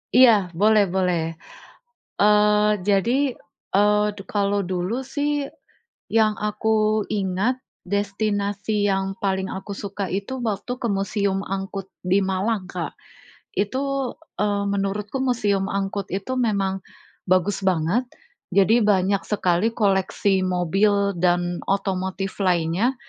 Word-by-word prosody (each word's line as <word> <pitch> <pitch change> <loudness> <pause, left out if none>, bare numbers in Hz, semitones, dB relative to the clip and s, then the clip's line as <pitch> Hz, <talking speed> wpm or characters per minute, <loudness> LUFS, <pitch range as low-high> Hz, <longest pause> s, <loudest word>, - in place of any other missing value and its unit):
Iya, 225 -8 +6
boleh 210 +1 +5
boleh. 180 -2 +1 1.0
Eee, 210 0 +5 0.2
jadi, 240 +7 +2 0.4
eee, 210 +1 +4
du 200 - -8
kalau 200 -1 +1
dulu 185 +6 -2
sih 290 +1 -2 0.6
yang 220 -1 +3
aku 215 0 +1
ingat, 200 +6 0 0.2
destinasi 205 +1 -1
yang 195 0 0
paling 190 -1 -1
aku 190 +2 -6
suka 200 -1 -4
itu 200 +8 -3
waktu 215 +3 -2
ke 235 - -1
Museum 200 -1 0
Angkut 195 0 -4 0.2
di 190 +2 +3
Malang, 195 +2 -1
Kak. - - -4 0.6
Itu, 265 +5 -1 0.3
eee, 205 -1 +1
menurutku 200 +5 -2
Museum 205 -6 +1
Angkut 195 0 -2
itu 195 +7 -4
memang 195 -4 0 0.5
bagus 185 +2 +2
banget, 185 +6 +1 0.5
jadi 205 +5 +5
banyak 195 -1 +2
sekali 200 +2 +1
koleksi 195 -1 +1
mobil 200 +3 +2
dan 175 0 +1
otomotif 195 -1 -2
lainnya, 180 +6 +1
200 Hz, 110 wpm, -23 LUFS, 190-215 Hz, 1.0 s, Iya